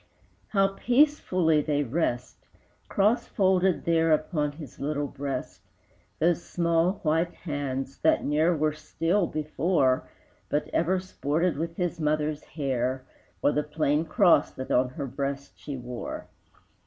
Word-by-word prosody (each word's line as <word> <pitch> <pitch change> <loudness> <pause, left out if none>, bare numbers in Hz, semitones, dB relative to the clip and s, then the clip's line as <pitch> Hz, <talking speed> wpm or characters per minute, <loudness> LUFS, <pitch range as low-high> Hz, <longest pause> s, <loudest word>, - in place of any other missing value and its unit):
How 195 -2 +3
peacefully 195 - +2
they 145 -1 0
rest, 125 -2 -2 0.4
Crossfolded 190 -3 +2
there 165 -1 +3
Upon 150 -1 +1
his 145 -4 -11
little 145 0 -1
breast, 140 -2 -5 0.6
Those 170 +1 +2
small, 170 +1 +1
white 165 +2 +1
hands 135 -4 -4
that - - +3
ne'er 155 +4 +2
were 155 0 +1
still 165 +5 0
before, 155 -3 0 0.4
But 150 - -1
ever 180 +3 +1
sported 170 -2 -1
with 165 +3 -4
his 175 -2 -2
mother's 150 -1 0
hair, 130 -3 -2 0.4
Or 145 - +5
the 150 - +1
plain 150 +1 0
cross 175 -5 +4
that 130 - -6
on 125 +1 +3
her 140 +2 -5
breast 140 +1 -4
she 145 -2 -6
wore! 125 -1 -6
155 Hz, 130 wpm, -27 LUFS, 140-170 Hz, 0.6 s, Or